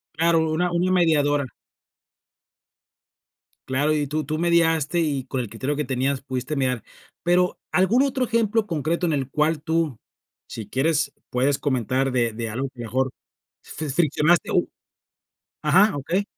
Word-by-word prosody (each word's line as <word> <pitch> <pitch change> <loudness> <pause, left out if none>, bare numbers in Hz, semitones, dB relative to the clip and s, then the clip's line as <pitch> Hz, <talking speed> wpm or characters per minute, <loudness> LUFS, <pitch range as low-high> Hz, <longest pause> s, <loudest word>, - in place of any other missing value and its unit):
Claro, 165 0 +2
una 175 +3 0
una 175 +2 +1
mediadora. 145 -6 +2 2.2
Claro, 140 +4 +1
y 150 -2 0
tú 155 +2 -2
tú 155 +2 -3
mediaste 165 -1 +2
y 140 -5 -1
con 130 -1 -2
el 115 - -6
criterio 130 +6 -3
que 150 - -1
tenías 135 0 -1
pudiste 130 +2 -4
mirar. 130 -3 -1 0.4
Pero, 180 +1 +2
¿algún 190 +8 +4
otro 265 -2 0
ejemplo 225 -2 +1
concreto 170 0 -1
en 165 - +1
el 135 -3 -1
cual 150 +2 +1
tú? 160 -7 -1 0.5
si 110 -2 -7
quieres, 145 +2 +1 0.2
puedes 135 +3 +1
comentar 130 0 0
de 120 -2 +1
de 115 0 -5
algo 130 +5 -3
mejor, 125 +2 -1 0.5
fri 155 -1 -6
friccionaste 155 +3 +2
o - - +2 1.0
ajá, 190 +7 +4
okey. 170 +8 -1
150 Hz, 145 wpm, -23 LUFS, 130-170 Hz, 2.2 s, algún